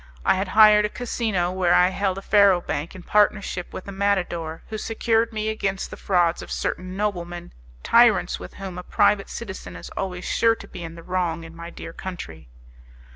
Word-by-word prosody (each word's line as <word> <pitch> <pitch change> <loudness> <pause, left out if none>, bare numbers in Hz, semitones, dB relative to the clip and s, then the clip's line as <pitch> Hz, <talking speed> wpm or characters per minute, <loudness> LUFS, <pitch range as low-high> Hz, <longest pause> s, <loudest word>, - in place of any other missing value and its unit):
I - - +5
had 190 +1 -1
hired 210 +1 +7
a 210 - 0
casino 215 -7 -1
where 185 -2 +2
I 180 0 +5
held 190 0 -1
a 195 - -7
faro 200 -3 +5
bank 165 -1 -4
in 185 - -10
partnership 205 -3 +1
with 185 - -8
a - - -5
matador, 180 -5 -1
who 215 -1 -4
secured 225 +1 0
me 215 -1 -2
against 195 -3 -2
the - - -6
frauds 175 -3 +1
of - - -9
certain 185 +1 -3
noblemen 175 -4 -3 0.3
tyrants, - - +4
with 90 - -10
whom 190 -2 -6
a - - -7
private 195 +2 +2
citizen 190 - -7
is 85 - -9
always 180 -2 -4
sure 230 0 +3
to - - -12
be - - -9
in 165 0 -7
the 170 - -11
wrong 175 -2 -2
in 165 0 -11
my 170 0 -8
dear 165 - -9
country. 80 - -8
185 Hz, 195 wpm, -24 LUFS, 175-210 Hz, 0.3 s, hired